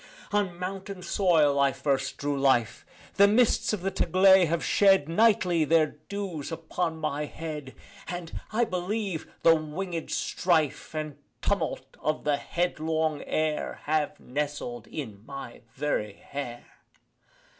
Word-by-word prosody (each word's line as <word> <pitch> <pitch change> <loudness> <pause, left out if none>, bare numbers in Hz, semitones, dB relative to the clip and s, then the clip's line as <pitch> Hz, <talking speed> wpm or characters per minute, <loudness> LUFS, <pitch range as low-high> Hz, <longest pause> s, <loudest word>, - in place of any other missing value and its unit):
On 200 -4 0
mountain 190 +1 -5
soil 160 -8 +3
I 140 0 +4
first 135 0 -1
drew 145 0 -1
life: 130 -4 +2 0.3
The 200 0 +8
mists 220 +3 +3
of 210 -4 -2
the 195 - 0
Taglay 190 0 +5
have 170 +1 -1
shed 195 -7 +4
Nightly 180 -3 +3
their 155 0 +2
dews 190 -7 -4
upon 165 0 -2
my 150 -1 -2
head, 150 -3 -7 0.3
And, 175 -1 -6
I 235 +2 +2
believe, 185 -2 -3
the 165 0 +7
wingèd 165 +2 -4
strife 160 -4 0
And 155 -2 -4 0.2
tumult - - -2
of 155 0 -1
the 145 -1 +2
headlong 160 -1 -1
air 155 -1 -1
Have 150 -1 0
nestled 140 -4 -4
in 110 -9 -7
my 135 -1 -8
very 130 -7 -1
hair. 120 +1 -7
160 Hz, 130 wpm, -28 LUFS, 145-185 Hz, 0.3 s, The